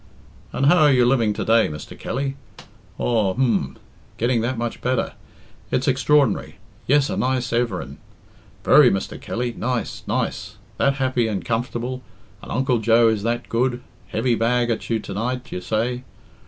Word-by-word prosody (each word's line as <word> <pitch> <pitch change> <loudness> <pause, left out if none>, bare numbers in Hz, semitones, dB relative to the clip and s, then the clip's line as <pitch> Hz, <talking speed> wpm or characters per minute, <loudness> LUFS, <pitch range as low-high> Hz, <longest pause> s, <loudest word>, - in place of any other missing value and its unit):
"And 135 - 0
how 175 +5 +6
are 150 -2 +6
you 125 -2 +4
living 120 -4 +3
to - - -4
day, 115 0 +4
Mr. 75 -1 -8
Kelly? 135 +2 -3 0.6
Aw, 110 -6 +1
h'm 105 - 0 0.4
getting 120 0 +1
that 120 +2 -2
much 120 0 -4
better 125 -1 -1 0.6
it's 130 - 0
extraordinary 135 +2 +2 0.3
Yes, 145 +1 +4
a - - -1
nice 125 -2 -1
everin', 120 0 -2 0.6
very, - - +7
Mr. 95 - -3
Kelly, 120 0 -3
nice, 125 -2 -3
nice - - -2 0.2
that 140 0 +2
happy 130 -3 0
and 100 -5 -3
comfortable 120 +2 -2 0.4
and - - -10
Uncle 130 -1 +1
Joe 115 +1 +4
is 110 -2 0
that 120 +2 -2
good 125 +1 0 0.2
heavy 120 +2 0
bag 120 +1 +1
at 115 - -3
you 115 - +2
to 105 -2 -7
night, 125 +5 -3
you 90 - -4
say? 120 +5 -1
120 Hz, 160 wpm, -22 LUFS, 115-130 Hz, 0.6 s, very